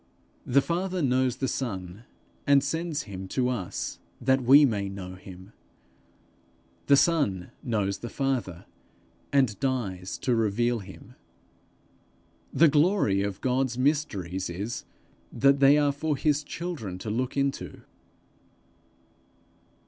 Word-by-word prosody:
The 135 +1 +4
Father 180 0 -1
knows 130 -1 +2
the 135 - -2
Son 100 -4 -4 0.4
and 140 -1 +5
sends 160 +1 -2
him 95 -3 -7
to 125 +5 0
us 110 -8 -4 0.2
that 130 +2 +2
we 140 +4 +7
may 100 -6 -1
know 95 -2 -7
him; 95 +2 -12 1.4
the 140 - +7
Son 135 - +1
knows 100 -4 -1
the 120 - -6
Father, 125 -12 -2 0.7
and 130 -7 +2
dies 105 -9 -2
to 125 - 0
reveal 115 +2 +1
him. 95 -2 -12 1.4
The 165 - +5
glory 150 - +3
of 100 -1 -3
God's 130 -1 0
mysteries 105 - -1
is 100 +7 -5 0.5
that 140 0 +3
they 140 +1 +6
are 145 -1 +3
for 145 +1 -2
his 150 +1 +1
children 145 - -5
to 105 +3 -5
look 125 +5 -2
into. 140 0 -2
125 Hz, 120 wpm, -27 LUFS, 100-140 Hz, 1.4 s, we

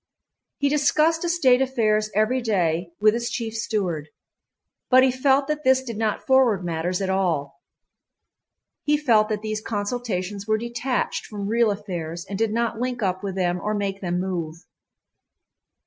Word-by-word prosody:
He 285 - +1
discussed 305 +3 +2
estate 295 -8 +3
affairs 215 -5 +1
every 220 +5 +2
day 175 -6 0
with 215 0 +5
his 235 0 -2
chief 230 -4 -4
steward. 185 -9 -2 0.8
But 255 0 +7
he 260 - +4
felt 270 +2 +2
that 300 0 -2
this 260 0 +4
did 235 -4 -6
not 215 0 -2
forward 250 -9 +3
matters 175 +3 -2
at 190 - -2
all. 160 -8 -1 1.2
He 295 0 +2
felt 225 -7 +3
that 215 -1 -2
these 215 0 -3
consultations 205 -3 -3
were 215 0 +2
detached 235 +2 -2
from 205 -2 -6
real 230 +1 +3
affairs 175 -5 -4
and 200 0 -5
did 225 -1 +1
not 230 0 -1
link 245 -2 -2
up 185 -1 -1
with 195 -2 -4
them 180 -1 0
or 215 0 -1
make 200 -1 -3
them 175 -1 -1
move. 170 -3 -4
215 Hz, 160 wpm, -24 LUFS, 190-250 Hz, 1.2 s, But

